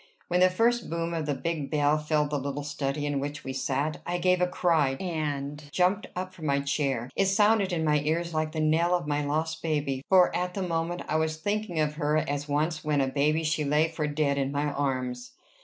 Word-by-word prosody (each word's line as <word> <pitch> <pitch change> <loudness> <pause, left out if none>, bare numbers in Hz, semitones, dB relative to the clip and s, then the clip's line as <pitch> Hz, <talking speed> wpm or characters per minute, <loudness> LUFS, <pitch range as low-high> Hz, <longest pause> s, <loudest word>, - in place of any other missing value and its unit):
When 180 0 +2
the 185 0 +6
first 235 +5 +1
boom 165 0 -2
of 160 -2 -2
the 145 - 0
big 155 0 -3
bell 150 0 +2
filled 150 -1 0
the 145 - 0
little 140 +1 -4
study 145 0 -2
in 145 -1 -1
which 145 +1 -5
we 130 - -4
sat, 140 +3 -1
I 175 +1 -2
gave 180 0 +2
a 180 - +4
cry, 165 -7 +2
and 150 -3 -3
jumped 185 +5 +1
up 185 +1 -4
from 160 -4 -6
my 140 0 +2
chair: 140 -4 -1
it 195 - +2
sounded 205 0 +3
in 165 -2 0
my 150 -1 +3
ears 165 +3 -1
like 155 0 -1
the 155 0 -2
knell 165 +3 +3
of 175 - -2
my 145 0 0
lost 160 +2 -1
baby, 145 -4 -1
for 185 -2 +5
at 180 0 -2
the 195 - -1
moment 170 0 -2
I 155 - +1
was 160 0 0
thinking 205 -1 -2
of 150 -1 0
her 150 -1 +1
as 145 -1 -2
once 150 +2 0
when 150 -2 +1
a 135 - +3
baby 150 +4 +1
she 155 -1 0
lay 150 +3 +2
for 160 -2 -2
dead 145 -1 0
in 135 0 -1
my 145 +1 -1
arms. 130 -3 -2
155 Hz, 225 wpm, -28 LUFS, 145-170 Hz, -, the